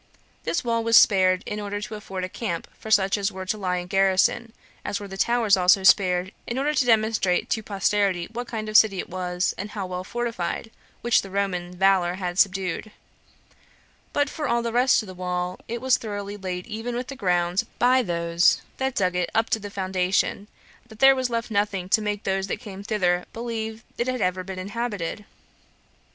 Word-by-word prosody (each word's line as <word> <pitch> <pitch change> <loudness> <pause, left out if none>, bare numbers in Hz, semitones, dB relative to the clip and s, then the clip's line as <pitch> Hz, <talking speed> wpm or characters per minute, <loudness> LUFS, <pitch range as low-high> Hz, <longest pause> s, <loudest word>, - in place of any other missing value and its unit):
This - - -1
wall 230 -1 0
was 230 0 +6
spared, 185 -2 +5
in 210 - -4
order 205 0 -4
to 210 +1 -7
afford 195 -3 -6
a - - -1
camp 185 -3 -4
for 220 - -8
such 200 -1 +3
as 200 +1 0
were 190 -1 -7
to 185 - -1
lie 185 -3 -1
in 180 - -4
garrison, 195 +5 +2 0.3
as 200 - -2
were 205 - -7
the 195 - -8
towers 230 0 +3
also 185 +1 +4
spared, 185 -1 +4 0.2
in 240 - -3
order 290 +3 +1
to 265 -3 +2
demonstrate 220 -5 +2
to 220 - +1
posterity 200 -3 0
what 245 0 -4
kind 215 -2 -4
of 215 - -6
city 210 -2 +6
it - - -5
was, 180 0 -1
and 205 +2 -4
how 205 -2 -4
well 180 0 -5
fortified, 230 -2 -3 0.3
which 240 0 +3
the 195 - -10
Roman 180 -2 -2
valor 185 -2 +3
had 180 -1 -3
subdued; 190 +1 +1 1.2
but 290 0 +1
for 300 +1 -4
all 235 -1 +1
the 235 - -2
rest 250 -1 +4
of - - -11
the 185 - -8
wall, 180 0 -3
it 235 +1 -4
was 260 -1 +1
so - - +5
thoroughly 205 -2 -5
laid 185 -2 -5
even 230 +2 -5
with 250 +1 -3
the 275 - -6
ground 180 -4 +1
by 255 +2 +4
those 170 -3 +2
that 265 -1 -1
dug 185 -4 +1
it 180 -1 0
up 225 0 +1
to 225 - +2
the 205 -1 -7
foundation, 190 +1 -1 0.4
that 220 -2 -14
there 270 +3 +7
was 260 -1 -1
left 230 0 -3
nothing 200 -3 0
to 220 - +4
make 210 -1 -3
those 195 0 -1
that - - -2
came 200 -5 -9
thither 180 -4 0
believe 225 -1 -5 0.2
it 240 - 0
had 255 0 -1
ever 185 -2 0
been 190 0 -7
inhabited. 205 -1 -4
200 Hz, 205 wpm, -24 LUFS, 185-230 Hz, 1.2 s, there